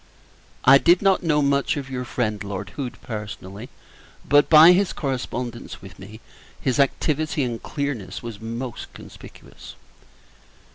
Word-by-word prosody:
I 135 Hz, +1 st, +8 dB
did 175 Hz, +6 st, +4 dB
not 195 Hz, -1 st, +3 dB
know 150 Hz, -3 st, +1 dB
much 140 Hz, +1 st, +1 dB
of 140 Hz, -2 st, -5 dB
your 125 Hz, -2 st, -5 dB
friend 110 Hz, -4 st, -2 dB
Lord 100 Hz, +1 st, -6 dB
Hood, 125 Hz, 0 st, -6 dB
personally; 105 Hz, 0 st, -7 dB, 0.6 s
but, 145 Hz, 0 st, +4 dB
by 160 Hz, +2 st, +9 dB
his 185 Hz, +1 st, +2 dB
correspondence 125 Hz, -3 st, -5 dB
with 95 Hz, -2 st, -13 dB
me, 105 Hz, +3 st, -12 dB, 0.4 s
his 130 Hz, 0 st, -1 dB
activity 150 Hz, +2 st, 0 dB
and 120 Hz, -2 st, -4 dB
clearness 125 Hz, -11 st, -5 dB
was 115 Hz, -3 st, -8 dB
most 115 Hz, +2 st, -6 dB
conspicuous. -, -, -13 dB
125 Hz, 135 wpm, -23 LUFS, 110-145 Hz, 0.6 s, by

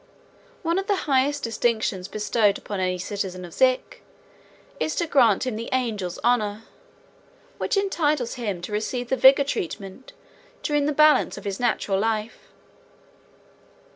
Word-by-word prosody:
One 335 Hz, +2 st, +1 dB
of 390 Hz, -, -5 dB
the 410 Hz, -, +2 dB
highest 280 Hz, +1 st, +1 dB
distinctions 220 Hz, -5 st, -1 dB
bestowed 210 Hz, -1 st, +1 dB
upon 205 Hz, -2 st, -6 dB
any 185 Hz, -1 st, 0 dB
citizen 185 Hz, -1 st, -4 dB
of 170 Hz, -, -12 dB
Zik 255 Hz, -1 st, +1 dB, 0.8 s
is 315 Hz, -, -1 dB
to 340 Hz, -, 0 dB
grant 250 Hz, -, +3 dB
him 245 Hz, -4 st, -3 dB
the 230 Hz, -, -6 dB
"Angel's 220 Hz, -9 st, -2 dB
Honor," 220 Hz, -3 st, +1 dB, 1.0 s
which -, -, 0 dB
entitles 305 Hz, -10 st, 0 dB
him 205 Hz, -8 st, -4 dB
to -, -, -6 dB
receive 240 Hz, +4 st, -3 dB
the 265 Hz, -, +2 dB
Vigor 270 Hz, +2 st, +6 dB
Treatment 195 Hz, -2 st, -5 dB, 0.5 s
during 295 Hz, -1 st, +1 dB
the -, -, +1 dB
balance 305 Hz, -1 st, +4 dB
of -, -, -10 dB
his 195 Hz, -1 st, -3 dB
natural 210 Hz, -5 st, 0 dB
life. 220 Hz, +1 st, -2 dB
235 Hz, 140 wpm, -24 LUFS, 205-275 Hz, 1.0 s, Vigor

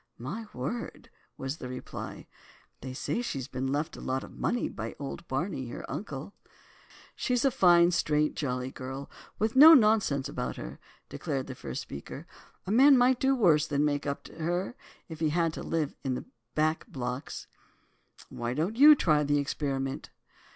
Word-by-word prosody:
"My 195 Hz, -, -6 dB
word," 145 Hz, -, -5 dB, 0.3 s
was 135 Hz, +3 st, -4 dB
the 125 Hz, -, -7 dB
reply. 125 Hz, 0 st, -7 dB, 0.6 s
"They 130 Hz, -, -6 dB
say 130 Hz, -, -2 dB
she's 140 Hz, -, -4 dB
been 130 Hz, +1 st, -3 dB
left 150 Hz, +3 st, -2 dB
a -, -, -10 dB
lot 130 Hz, +1 st, -2 dB
of -, -, -11 dB
money 240 Hz, -, 0 dB
by 110 Hz, 0 st, -6 dB
old 140 Hz, +4 st, -7 dB
Barney, 135 Hz, -1 st, -2 dB
her 120 Hz, -, -7 dB
uncle." 150 Hz, -1 st, -6 dB, 0.8 s
"She's 250 Hz, +1 st, 0 dB
a 270 Hz, -, +4 dB
fine, 175 Hz, -4 st, +5 dB
straight, 150 Hz, -3 st, +1 dB
jolly 125 Hz, -2 st, -2 dB
girl, 135 Hz, +2 st, -7 dB, 0.3 s
with 220 Hz, +2 st, 0 dB
no 315 Hz, +4 st, +11 dB
nonsense 210 Hz, -, +3 dB
about 65 Hz, 0 st, -4 dB
her," -, -, -8 dB, 0.3 s
declared 135 Hz, -2 st, -3 dB
the 130 Hz, -, -7 dB
first 70 Hz, -, -6 dB
speaker, 70 Hz, -, -8 dB, 0.4 s
"a 190 Hz, -, -3 dB
man 270 Hz, +4 st, +7 dB
might 250 Hz, +1 st, +4 dB
do 270 Hz, 0 st, +3 dB
worse 165 Hz, -, +4 dB
than 145 Hz, 0 st, +1 dB
make 145 Hz, -1 st, -1 dB
up 140 Hz, -, -3 dB
to -, -, -13 dB
her, 175 Hz, +7 st, -1 dB, 0.3 s
if 160 Hz, -2 st, -9 dB
he 160 Hz, -1 st, +1 dB
had 165 Hz, +1 st, +1 dB
to -, -, -6 dB
live 160 Hz, -3 st, -1 dB
in 130 Hz, -2 st, -1 dB
the -, -, -6 dB, 0.3 s
back 155 Hz, +5 st, +1 dB
blocks." 130 Hz, -, -5 dB, 0.8 s
"Why 120 Hz, +1 st, -4 dB
don't 175 Hz, -, -1 dB
you 300 Hz, +3 st, +9 dB
try 155 Hz, -, +3 dB
the 145 Hz, 0 st, +2 dB
experiment?" 135 Hz, -2 st, -2 dB
150 Hz, 170 wpm, -29 LUFS, 135-200 Hz, 0.8 s, no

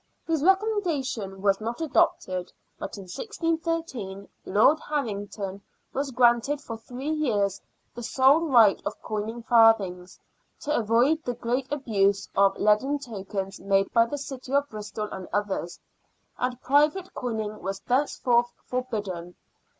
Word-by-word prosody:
His 320 Hz, -3 st, 0 dB
recommendation 330 Hz, -, 0 dB
was 195 Hz, 0 st, +2 dB
not 230 Hz, +2 st, -4 dB
adopted, 185 Hz, -, +1 dB, 0.3 s
but -, -, -6 dB
in 200 Hz, -, -8 dB
1613 320 Hz, -, -3 dB, 0.2 s
Lord 220 Hz, +11 st, +4 dB
Harrington 205 Hz, -9 st, -4 dB, 0.3 s
was 275 Hz, +1 st, -1 dB
granted 245 Hz, +3 st, +3 dB
for 230 Hz, -, -7 dB
three 250 Hz, +6 st, -6 dB
years 210 Hz, -11 st, 0 dB, 0.3 s
the 240 Hz, -, -7 dB
sole 270 Hz, +7 st, +4 dB
right 230 Hz, -8 st, +5 dB
of -, -, -4 dB
coining 220 Hz, +2 st, -4 dB
farthings, 210 Hz, -6 st, +3 dB, 0.2 s
" -, -, -44 dB
to 300 Hz, +1 st, -1 dB
avoid 240 Hz, +8 st, +2 dB
the 245 Hz, -, -3 dB
great 250 Hz, +4 st, -2 dB
abuse 200 Hz, -8 st, +1 dB
of 195 Hz, 0 st, +4 dB
leaden 215 Hz, +8 st, +3 dB
tokens 195 Hz, -6 st, -5 dB
made 195 Hz, 0 st, +1 dB
by 230 Hz, 0 st, +5 dB
the 290 Hz, -, -4 dB
city 270 Hz, -2 st, -7 dB
of 280 Hz, 0 st, +2 dB
Bristol 210 Hz, 0 st, -5 dB
and 190 Hz, -1 st, -7 dB
others," 195 Hz, -3 st, -2 dB, 0.6 s
and 250 Hz, 0 st, -2 dB
private 300 Hz, +7 st, +2 dB
coining 220 Hz, -4 st, -4 dB
was 195 Hz, +2 st, -4 dB
thenceforth 245 Hz, -2 st, +1 dB
forbidden. 205 Hz, -9 st, -4 dB
235 Hz, 135 wpm, -26 LUFS, 200-280 Hz, 0.6 s, right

